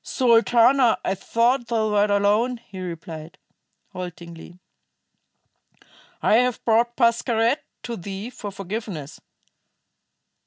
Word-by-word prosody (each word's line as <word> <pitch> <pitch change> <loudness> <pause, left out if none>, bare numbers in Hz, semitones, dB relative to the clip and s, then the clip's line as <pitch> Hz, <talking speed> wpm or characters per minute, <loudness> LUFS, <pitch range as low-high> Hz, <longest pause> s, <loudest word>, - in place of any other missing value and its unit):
"Sultana, 240 0 +4
I 190 - +1
thought 235 +5 0
thou 220 -2 0
wert 205 0 +2
alone," 205 +5 +2
he 195 -4 -12
replied, 165 -2 -8 0.6
haltingly. 175 -1 -9 1.7
"I 220 - +5
have 250 0 0
brought 235 +1 +2
Pascherette 235 +1 +1 0.2
to 235 -1 -5
thee 195 +6 -7
for 225 -5 -7
forgiveness." 195 -6 -6
220 Hz, 95 wpm, -23 LUFS, 190-235 Hz, 1.7 s, I